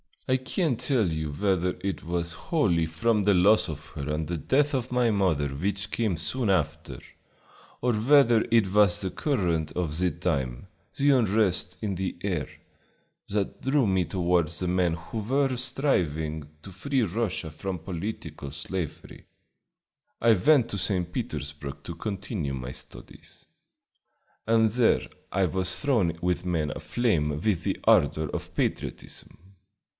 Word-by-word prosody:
"I 130 - +3
can't 130 - -1
tell 125 - +2
you 80 -1 -3
whether 90 +1 0
it 95 -5 -3
was 85 0 -1
wholly 85 - +1
from 105 +7 +1
the 100 +1 +4
loss 100 +4 +5
of 75 -1 -7
her 75 -2 -6
and 75 0 -2
the 85 - -2
death 140 - +1
of 130 -2 -1
my 125 -2 +3
mother 90 -9 +1
which 100 +8 -3
came 110 -6 0
soon 105 +9 -1
after, 80 -4 -1 0.8
or 125 0 +2
whether 120 0 +5
it 105 -5 +3
was 105 0 +4
the 95 -2 -2
current 85 - -1
of 85 -3 -2
the 90 0 +3
time, 75 -5 -2 0.3
the 140 +1 +4
unrest 105 -7 +2
in 100 -3 -2
the 95 +1 -3
air, 85 -9 -1 0.8
that 100 -1 -2
drew 135 0 +2
me 95 -3 +2
toward 90 -3 +1
the 85 +3 -3
men 90 -2 +2
who 85 +7 -6
were 135 +4 +1
striving 80 - -1
to 95 - -9
free 130 +8 0
Russia 100 -5 -2
from 90 +4 -4
political 80 -4 -6
slavery. 80 +3 -6 1.0
I 115 - +5
went 130 +4 +4
to 100 - -3
St. 90 -1 0
Petersburg 75 - -5
to - - -6
continue 95 - -4
my 65 -1 -5
studies, - - -11 1.0
and 115 -1 +4
there 115 +1 +2 0.2
I 95 0 +2
was 95 +2 0
thrown 110 - +1
with 90 0 0
men 80 -5 0
aflame 105 - 0
with 100 -6 0
the - - -1
ardor 80 -1 +3
of - - -6
patriotism. - - -4
95 Hz, 150 wpm, -27 LUFS, 80-115 Hz, 1.0 s, loss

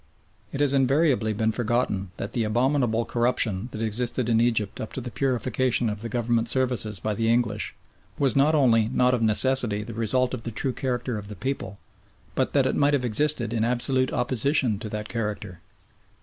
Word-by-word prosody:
It 140 - -3
has 140 -1 +2
invariably 135 -3 +2
been 110 +1 0
forgotten 110 -5 -1
that 100 - -5
the 120 - 0
abominable 120 0 +1
corruption 120 -3 +1
that 110 - -4
existed 120 +2 -2
in 115 -1 +3
Egypt 110 -4 0
up 110 - -6
to - - -4
the 120 0 -6
purification 125 -2 0
of 105 0 -6
the 115 - -4
Government 115 0 0
services 125 -6 0
by 110 - -2
the 115 +2 +1
English 110 -4 0 0.4
was 135 -4 +2
not 145 +3 +4
only 115 -6 +4
not 125 +1 +2
of 125 - 0
necessity 110 -1 +2
the 115 - -8
result 125 +3 0
of 130 - -4
the 115 - -5
true 125 +4 -2
character 125 -3 -2
of 100 - -10
the 105 - -8
people, 100 -3 -4 0.6
but - - -1
that - - +3
it - - 0
might 145 0 +3
have 125 -3 -1
existed 120 0 +1
in 110 -2 0
absolute 130 +2 0
opposition 125 -2 0
to 110 -1 -6
that 105 0 -5
character. 105 -6 -4
120 Hz, 190 wpm, -25 LUFS, 110-130 Hz, 0.6 s, not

